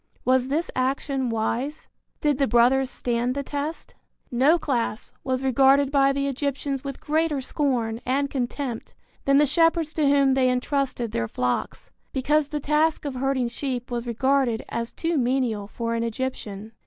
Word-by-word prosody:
Was 255 0 +3
this 310 +5 -1
action 265 0 0
wise? 235 +6 -2 0.3
Did 295 -2 +1
the 275 - +3
brothers 255 +2 +4
stand 245 +1 -1
the 280 - -2
test? 290 +3 -5 0.4
No 270 +7 +4
class 250 -8 -2
was 260 0 -1
regarded 270 +2 +4
by 275 -1 +4
the 275 0 -1
Egyptians 275 0 -2
with 275 -1 -6
greater 310 -1 0
scorn 250 -4 -1
and 275 +3 +1
contempt 255 -2 -4 0.3
than 275 0 +4
the 295 - +6
shepherds 330 +1 +2
to 300 -3 +2
whom 275 -1 +4
they 260 -1 +3
entrusted 250 -2 -1
their 115 - -1
flocks, 125 +2 -3 0.2
because 290 +2 +2
the 300 0 -3
task 300 +2 +1
of 285 - -2
herding 260 -1 0
sheep 245 0 -4
was 240 0 -3
regarded 255 0 +1
as 230 0 -3
too 330 -2 -1
menial 245 -5 0
for 230 +2 -3
an 230 - -1
Egyptian. 225 -3 -4
265 Hz, 160 wpm, -25 LUFS, 240-285 Hz, 0.4 s, the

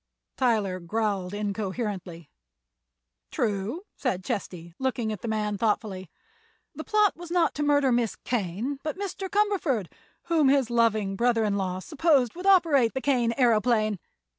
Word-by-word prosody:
Tyler 215 -8 +1
growled 195 0 -2
incoherently. 200 - -4 1.0
"True," 215 - -2
said 185 0 -2
Chesty, 180 -7 -5
looking 250 -4 -1
at 210 - -8
the - - -5
man 210 -2 -1
thoughtfully; 210 -5 -1 0.6
"the - - -7
plot 425 -2 +2
was 345 0 -10
not 345 -1 +2
to 295 - -4
murder 285 -2 +3
Miss 235 -3 +1
Kane, 235 +5 -3
but 310 +3 -4
Mr. 385 -1 -4
Cumberford, 365 - 0 0.3
whom 315 -5 +3
his 270 -4 +2
loving 220 -4 +2
brother 235 +1 +2
in 205 -2 0
law 185 -2 -2
supposed 275 - +1
would 360 +3 -5
operate 310 -12 +4
the - - 0
Kane 245 -5 +1
aeroplane. 220 -4 +2
230 Hz, 140 wpm, -26 LUFS, 200-285 Hz, 1.0 s, operate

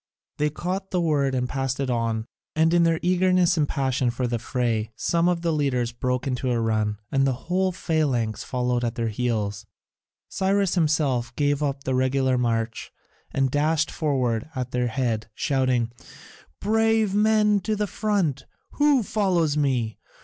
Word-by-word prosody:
They 150 0 +2
caught 185 +5 -4
the 180 - 0
word 145 -5 +1
and 125 -1 0
passed 135 0 -2
it 135 -2 -1
on, 115 -2 -1 0.3
and 160 +1 +3
in 175 - +5
their 165 -1 +3
eagerness 180 -1 +3
and 150 -3 +1
passion 130 -2 0
for 125 +2 -2
the 120 -1 -1
fray 115 -3 -1
some 170 +7 +1
of 175 -1 -1
the 165 -1 +1
leaders 130 -5 0
broke 125 +1 -2
into 130 -1 -1
a 120 -1 +1
run, 110 -2 0
and 135 0 +2
the 135 - +1
whole 185 +2 +1
phalanx 140 - -1
followed 125 -1 -1
at 120 -1 -1
their 115 -1 -1
heels. 110 -3 -2 0.6
Cyrus 195 -1 +1
himself 145 -8 +1
gave 145 0 +1
up 140 -2 -2
the 130 - -1
regular 130 0 +2
march 115 -2 -1 0.4
and 135 -1 0
dashed 155 +2 +1
forward 130 -6 -1
at 125 -1 -3
their 125 0 0
head, 115 -3 -2
shouting: 130 -4 +1 0.7
"Brave 220 -1 +2
men 210 0 +3
to 215 +2 -1
the 210 0 0
front! 185 - -1 0.2
Who 290 -4 +3
follows 180 -8 +1
me? 130 -7 0
135 Hz, 165 wpm, -24 LUFS, 120-175 Hz, 0.7 s, in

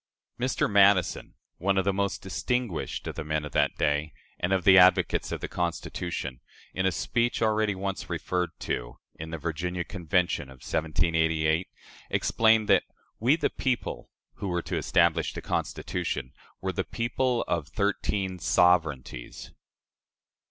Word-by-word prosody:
Mr. 130 +1 +1
Madison, 100 -3 +3 0.2
one 95 +2 +1
of 95 - +2
the 100 - +2
most 100 0 -1
distinguished 110 0 -2
of - - -4
the 80 - -5
men 75 0 -2
of 75 - -7
that - - +2
day 75 +1 0 0.3
and 90 - -1
of 95 -2 +2
the 95 - +7
advocates 90 0 +5
of - - -4
the - - -3
Constitution, 85 -6 -3 0.3
in 95 0 +1
a - - +2
speech 120 +7 0
already 110 -2 +2
once 95 0 -4
referred 90 -1 -1
to, - - -3 0.2
in 80 +1 -6
the 80 - -4
Virginia 85 +3 -3
Convention 90 -2 0
of 65 -1 -14
1788, 80 +1 +1 0.4
explained 110 -1 +3
that - - +5 0.4
"We, 125 +7 +4
the 165 - 0
people," 130 -2 -2 0.3
who 100 - -4
were 90 -2 -1
to - - -3
establish - - +2
the - - -6
Constitution, 65 +1 -3 0.3
were 95 0 -2
the - - -1
people 120 +1 -1
of 85 -4 -1
"thirteen 95 +2 -1
SOVEREIGNTIES." 80 -8 +1
90 Hz, 145 wpm, -27 LUFS, 80-100 Hz, 0.4 s, the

